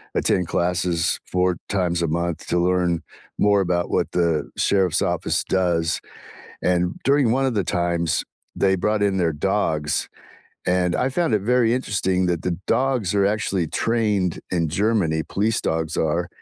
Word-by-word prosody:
attend 90 - +1
classes 85 -1 0
4 90 -1 +1
times 90 -3 0
a 85 - +1
month 85 +1 -2
to - - 0
learn 90 -1 +1 0.4
more 100 -1 +4
about 85 -1 0
what - - 0
the 85 -3 0
sheriff's 95 -5 +2
office - - 0
does, 85 -3 0 0.6
and 90 0 +1
during 135 -4 +3
one 135 +2 +1
of 130 - 0
the 100 -3 0
times, 85 -1 0 0.3
they 95 -1 +2
brought 105 +3 0
in 100 -1 +1
their 85 -3 +1
dogs, 80 -2 -1 0.6
and 90 -1 +1
I 130 - 0
found 150 -3 +1
it 105 - +1
very 120 +1 +3
interesting 95 -7 0
that 85 -2 0
the 90 -2 -1
dogs 125 -8 +1
are 100 -1 +3
actually 100 -4 0
trained 105 -6 0
in 85 -3 0
Germany- 95 -6 +1
police 105 +3 0
dogs 80 0 -2
are 85 +3 0
90 Hz, 155 wpm, -22 LUFS, 85-105 Hz, 0.6 s, more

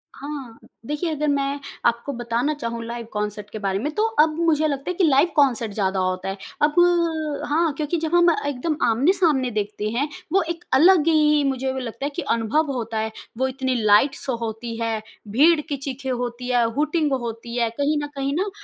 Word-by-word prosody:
हाँ, 275 -5 -7 0.3
देखिए 295 +6 -2
अगर 300 0 -1
मैं 280 0 0 0.3
आपको 235 +4 +1
बताना 240 +5 0
चाहूँ 235 -5 -4
लाइव 235 0 -5
कॉन्सर्ट 210 0 -3
के 215 - -7
बारे 195 -1 -1
में 295 +8 -2
तो 430 - +2 0.2
अब 310 +1 +7 0.2
मुझे 310 -1 +3
लगता 280 +3 -3
है - - 0
कि 380 - +2
लाइव 285 +1 +5
कॉन्सर्ट 245 -7 +2
ज़्यादा 195 -2 0
होता 185 0 -1
है। 195 - -4 0.2
अब 295 0 +3 0.7
हाँ, 320 +1 +2
क्योंकि 305 +3 -1
जब 320 +1 -1
हम 345 0 +6 0.2
एकदम 285 +3 -1
आमने-सामने 275 - +2
देखते 210 0 -2
हैं, 280 +4 +1 0.3
वो 390 - +5
एक 335 +1 -4
अलग 330 +3 +6
ही 300 -2 +4
मुझे 265 0 -2
लगता 250 +2 -5
है 285 - 0
कि - - -2
अनुभव 275 +3 0
होता 230 -3 -3
है। 220 0 -2 0.3
वो 260 +2 +1
इतनी 260 0 -2
लाइट 215 +7 +5
शो 260 -3 -3
होती 230 0 -5
है, 225 -1 -1 0.3
भीड़ 300 +10 +4
की 295 -2 -4
चीखें 270 -1 -5
होती 245 0 -3
है, 245 -1 +3
हूटिंग 305 +1 +1
होती 235 -1 -4
है। 235 -1 +2
कहीं 285 +6 0
न - - -3
कहीं 275 0 -1
ना 385 +5 0
265 Hz, 195 wpm, -23 LUFS, 230-300 Hz, 0.7 s, अब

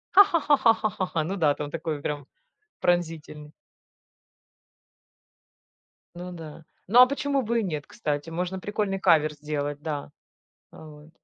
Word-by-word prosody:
Ха 400 - +11
ха 365 -4 0
ха 290 -2 +6
ха 225 -3 +5
ха 215 -1 -1
ха 190 -1 -3
ха, 160 -2 +1
ну 190 +5 -3
да, 150 -4 +3
там 145 -1 -5
такой 160 -1 -3
он - - -12
прям 145 -1 -4 0.6
пронзительный. 160 -4 -1 2.6
Ну 180 +1 -7
да. 160 -2 -10 0.2
Ну, 235 +5 +5
а 250 - +11
почему 280 0 -1
бы 235 -1 0
и - - -3
нет, 155 -7 -4
кстати? 145 +1 -3
Можно 180 +3 -3
прикольный 205 -1 -2
кавер 155 -4 +4
сделать, 145 -1 -4
да. 145 -2 -4 0.6
А 160 - -13
вот. 150 0 -14
165 Hz, 160 wpm, -26 LUFS, 150-200 Hz, 2.6 s, Ха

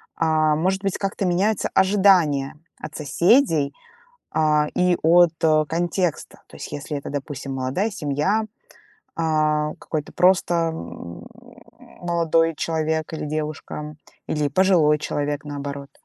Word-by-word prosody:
А, 155 -1 +2
может 190 +5 0
быть, 195 -1 -1
как-то 195 0 -2
меняются 190 +4 +1
ожидания 190 -8 +3 0.3
от - - -8
соседей, 160 - +2 0.6
а, 150 -1 +2
и 180 -1 +2
от, 170 +1 +5
а, 155 -1 +4
контекста. 175 +1 -2
То - - -13
есть - - -8
если 145 +1 -4
это, 140 - -8
допустим, 140 -1 -5
молодая 135 +12 -1
семья, 180 +5 -1 0.7
а, 155 -2 +1
какой-то 150 -2 -5
просто, 180 -1 +3 0.2
м, 85 - -9 0.8
молодой 165 -2 +1
человек 160 0 -2
или 155 - -4
девушка, 150 0 -5 0.3
или 150 -1 0
пожилой 170 -3 +3
человек, 145 -1 -3
наоборот. 140 -1 -6
155 Hz, 120 wpm, -22 LUFS, 150-175 Hz, 0.8 s, от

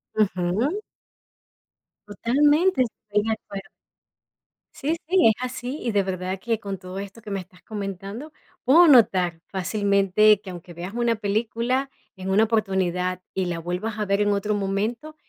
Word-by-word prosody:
Ujú. 210 - 0 1.3
Totalmente. 290 - +3
Estoy 210 -3 -2
de - - +1
acuerdo. 200 -2 -8 1.1
Sí, 310 +4 -1
sí, 370 -8 +5
es 220 - +5
así, 255 +2 -4
y 235 - -1
de 200 -1 +2
verdad 185 0 -3
que 225 +2 -1
con 195 -3 -5
todo 185 +1 -7
esto 200 +3 -8
que 210 - -9
me 195 - -1
estás 180 -1 -13
comentando, 200 - -6 0.3
puedo 325 +7 +7
notar 185 - +4
fácilmente 200 +2 +3
que 195 - -10
aunque 175 0 -10
veas 175 +5 -7
una 235 -1 +1
película 230 +5 -1 0.3
en 190 0 -6
una 205 +3 +4
oportunidad 185 -4 0
y 190 -1 -1
la 170 -1 -3
vuelvas 180 +6 -3
a 210 - 0
ver 200 +1 +1
en 205 0 +2
otro 205 +1 0
momento, 215 +10 -2
205 Hz, 155 wpm, -24 LUFS, 190-235 Hz, 1.3 s, puedo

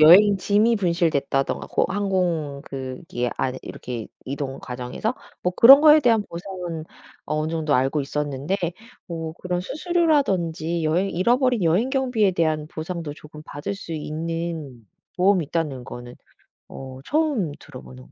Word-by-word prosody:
여행 195 +6 +8
짐이 210 +5 +3
분실됐다든가 165 -7 0
고 - - +1
항공 180 -8 -1
그 130 -1 -6
기 120 0 -1
안에 130 0 -1
이렇게 120 -3 -6 0.2
이동 135 0 -4
과정에서 125 - -4 0.3
뭐 180 - 0
그런 270 +7 +10
거에 305 0 +8
대한 230 -5 +3
보상은 175 -2 -6 0.4
어느 155 +1 -1
정도 160 -3 0
알고 135 +4 +2
있었는데 145 +4 -2 0.5
뭐 165 -2 -5
그런 180 0 -3
수수료라든지 195 - 0
여행 175 +5 +1
잃어버린 245 +4 +2
여행 180 +10 +3
경비에 250 -7 +2
대한 155 -3 0
보상도 160 -1 -5
조금 150 0 -12
받을 160 +7 -5
수 195 -4 -8
있는 160 -5 -4 0.3
보험이 185 -1 +3
있다는 145 -5 -2
거는 120 0 -9 0.5
어 130 -1 -9
처음 290 - +1
들어보는 130 -2 -12
165 Hz, 310 characters per minute, -23 LUFS, 145-200 Hz, 0.5 s, 그런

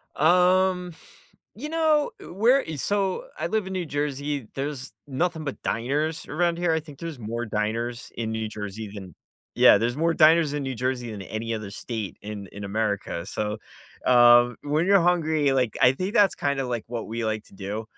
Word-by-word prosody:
Um, 180 +2 +3 0.6
you 275 +8 -6
know, 315 -2 +2
uh, - - -10
where, 240 +9 +4
e 160 - -5
so 200 - -1
I - - -2
live 215 -3 -1
in 190 - -5
New 185 -2 -2
Jersey, 145 -3 -3
there's 135 -1 -4
nothing 160 +4 -1
but 140 - -5
diners 150 +7 -1
around 170 +2 +1
here. 175 -2 +1
I 160 - +1
think 150 -3 -13
there's 165 -5 -6
more 115 +2 -4
diners 115 +2 -3
in 110 -1 -3
New 110 -1 -2
Jersey 105 0 -6
than 95 -5 -9 0.4
Yeah, - - +7
there's 115 +4 0
more 165 +1 +2
diners 160 -2 +5
in 145 - -2
New 135 -1 -3
Jersey 125 -1 -2
than 105 -2 -7
any 110 +4 -4
other 110 -3 -4
state 110 -1 -5
in 105 -1 -7
in 100 0 -7
America, 100 -4 -2
so, 105 +1 -3 0.5
um, 120 0 +6
when 150 +4 0
you're 200 0 +6
hungry, 160 -5 +2
like, 125 -5 0
I 125 0 +7
think 185 - -4
that's 205 -4 +5
kinda 140 -1 -1
like 120 -3 -3
what 120 -1 -5
we 115 +1 -4
like 110 -1 -2
to - - -19
do, 100 +3 -5
135 Hz, 190 wpm, -25 LUFS, 110-170 Hz, 0.6 s, Yeah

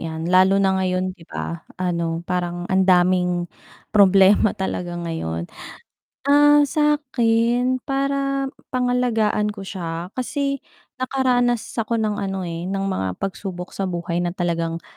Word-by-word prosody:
'yan. 160 0 -4
Lalo 185 +2 +5
na 190 -1 +2
ngayon, 185 0 -1
'di 165 - -16
ba, 80 +1 -5 0.2
ano, 170 -2 -1
parang 175 -1 -2
ang 190 0 +3
daming 180 -1 +3 0.4
problema 195 +1 +5
talaga 175 -2 -4
ngayon. 85 - -4 0.8
Ah, 290 +1 +6
sakin, 255 -4 +1
para 275 0 0 0.3
pangalagaan 245 -4 +1
ko 200 - -8
siya, 175 -2 -5
kasi 275 +2 -1 0.4
nakaranas 250 -2 +1 0.2
ako 225 +1 -1
ng 215 -2 0
ano, 195 -1 -3
eh, 170 0 -5
ng 195 +1 -2
mga 95 - -1
pagsubok 185 -2 -5
sa 195 - -3
buhay 170 -1 -3
na 175 0 -1
talagang, 170 -2 -2
190 Hz, 130 wpm, -22 LUFS, 175-245 Hz, 0.8 s, Ah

